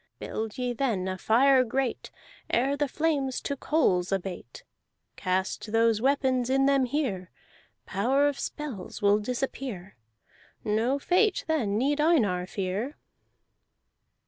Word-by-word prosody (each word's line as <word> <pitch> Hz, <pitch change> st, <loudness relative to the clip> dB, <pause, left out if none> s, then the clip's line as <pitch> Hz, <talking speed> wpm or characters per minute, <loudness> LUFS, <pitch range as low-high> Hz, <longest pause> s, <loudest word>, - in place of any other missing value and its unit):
Build 220 Hz, -1 st, -5 dB
ye 250 Hz, -1 st, -1 dB
then 225 Hz, -8 st, -1 dB
a 185 Hz, -, -2 dB
fire 255 Hz, +7 st, +4 dB
great; 260 Hz, +1 st, -2 dB, 0.4 s
Ere 270 Hz, +4 st, +2 dB
the 290 Hz, 0 st, 0 dB
flames 280 Hz, -3 st, 0 dB
to 280 Hz, -, -3 dB
coals 195 Hz, -, +1 dB
abate, 190 Hz, -10 st, -4 dB, 0.5 s
Cast 190 Hz, +3 st, -2 dB
those 225 Hz, -1 st, +3 dB
weapons 260 Hz, -2 st, +1 dB
in 270 Hz, +1 st, +3 dB
them 275 Hz, -1 st, +3 dB
here. 240 Hz, -, -2 dB, 0.6 s
Power 265 Hz, +9 st, +2 dB
of 285 Hz, -1 st, -2 dB
spells 260 Hz, -11 st, -6 dB
will 205 Hz, +1 st, +5 dB
disappear; 240 Hz, -4 st, -4 dB, 0.7 s
No 225 Hz, +6 st, +1 dB
fate 370 Hz, +8 st, +2 dB
then 235 Hz, -11 st, 0 dB
need 285 Hz, +5 st, +1 dB
Einar 210 Hz, -, +2 dB
fear!" 200 Hz, -, -3 dB
250 Hz, 120 wpm, -27 LUFS, 205-275 Hz, 0.7 s, will